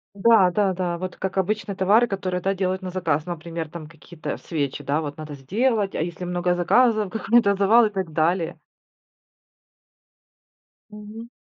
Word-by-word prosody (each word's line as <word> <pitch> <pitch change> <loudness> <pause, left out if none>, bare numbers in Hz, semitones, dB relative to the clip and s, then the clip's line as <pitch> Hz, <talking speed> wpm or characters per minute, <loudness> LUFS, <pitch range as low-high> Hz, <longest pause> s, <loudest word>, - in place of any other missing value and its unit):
Да-да-да, 190 -4 +3
вот 185 0 -6
как 190 0 -3
обычно 205 +1 -1
товары, 205 +5 +4
которые, 185 -4 -3
да, 195 - +1
делают 190 0 -2
на 185 - -5
заказ, 165 -5 -1
например, 165 -2 -6
там 165 -2 -8
какие-то 160 +1 -8
свечи, 145 -3 -4
да, 145 +3 0
вот 145 -2 -6
надо 155 -1 -8
сделать, 205 - 0
а - - -1
если 175 +1 -5
много 175 0 0
заказов, 215 +3 +2
какой-то 225 -2 +3
завал 220 +4 +5
и - - -2
так 190 -5 -4
далее. 165 +2 0 2.3
Мгм. 210 +2 -10
185 Hz, 145 wpm, -23 LUFS, 165-205 Hz, 2.3 s, завал